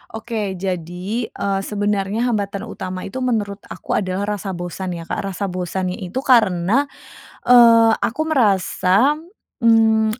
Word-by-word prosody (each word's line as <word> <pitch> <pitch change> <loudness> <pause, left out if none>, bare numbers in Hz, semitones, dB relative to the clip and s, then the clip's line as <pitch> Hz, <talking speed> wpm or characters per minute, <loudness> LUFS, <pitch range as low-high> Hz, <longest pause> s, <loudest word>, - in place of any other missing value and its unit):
Oke, 220 -4 -4
jadi, 185 +5 -4
eee, 195 -1 -2
sebenarnya 205 +1 -1
hambatan 200 -2 -2
utama 185 -4 -6
itu, 210 +7 -6
menurut 215 -6 -1
aku - - -8
adalah 200 +2 -2
rasa 190 0 -5
bosan 175 +1 -5
ya, 165 - -7
Kak, - - -4
rasa 195 -1 -3
bosannya 180 +2 -3
itu 195 +8 -4
karena, 225 +1 +3 0.6
eee, 230 -2 +7
aku 265 +8 -1
merasa 230 -1 +2 0.4
mmm, 220 -1 +3
205 Hz, 130 wpm, -20 LUFS, 185-230 Hz, 0.6 s, eee